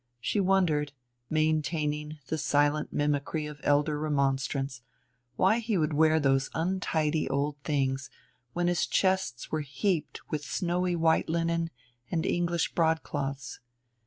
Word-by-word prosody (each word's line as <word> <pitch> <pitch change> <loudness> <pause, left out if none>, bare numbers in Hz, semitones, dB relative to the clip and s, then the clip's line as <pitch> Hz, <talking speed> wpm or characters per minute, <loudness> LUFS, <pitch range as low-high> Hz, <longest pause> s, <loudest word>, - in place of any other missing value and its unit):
She 205 - 0
wondered, 175 -7 +2 0.4
maintaining 155 -1 0
the 160 +2 -2
silent 145 +1 +2
mimicry 145 +1 0
of 150 -1 -8
elder 150 +1 +2
remonstrance, 140 -2 0 0.5
why 195 - +3
he 225 -3 0
would 155 -2 +1
wear 160 +1 +4
those 135 -2 +2
untidy 160 -3 0
old 140 +1 -1
things 135 -2 0 0.4
when 175 0 0
his 175 -1 +1
chests 190 -10 0
were 155 - 0
heaped 150 +4 -2
with 150 -1 -2
snowy 180 +2 0
white 160 -1 +2
linen 165 0 0 0.4
and 165 -2 -1
English 170 -1 0
broadcloths. 145 -4 -1
155 Hz, 125 wpm, -29 LUFS, 145-170 Hz, 0.5 s, wear